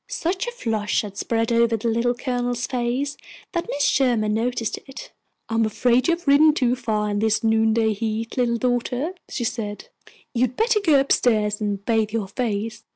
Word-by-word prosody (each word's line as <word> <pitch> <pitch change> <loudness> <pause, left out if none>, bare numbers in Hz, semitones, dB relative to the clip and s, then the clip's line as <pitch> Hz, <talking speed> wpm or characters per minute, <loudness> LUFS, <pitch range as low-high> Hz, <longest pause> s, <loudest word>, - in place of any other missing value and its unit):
Such 370 +7 -2
a - - -2
flush 220 - -1
had 200 -2 -8
spread 225 +2 -1
over 230 -1 +3
the 225 - -3
Little 235 +2 +1
Colonel's 245 -1 -2
face 255 +3 -2 0.3
that 340 -2 -2
Mrs. 285 - -2
Sherman 235 -6 +2
noticed 230 0 -1
it. 270 - -10 0.4
"I - - -5
am 225 0 +3
afraid 240 +4 +2
you 340 - +3
have 340 -3 -18
ridden 300 +2 +6
too 250 -4 +2
far 220 -4 -1
in 205 - -1
this 220 +1 +1
noonday 220 0 +2
heat, 220 +2 -3
little 240 -2 +1
daughter," 250 +6 -1 0.2
she 245 - -3
said. 225 - -4 0.4
"You'd 250 0 0
better 450 -1 +3
go 315 -8 +4
up 275 - -1
stairs 210 -3 +2
and 205 -1 -2
bathe 220 -2 +1
your 215 -4 -2
face." 220 0 -3
235 Hz, 185 wpm, -23 LUFS, 220-255 Hz, 0.4 s, ridden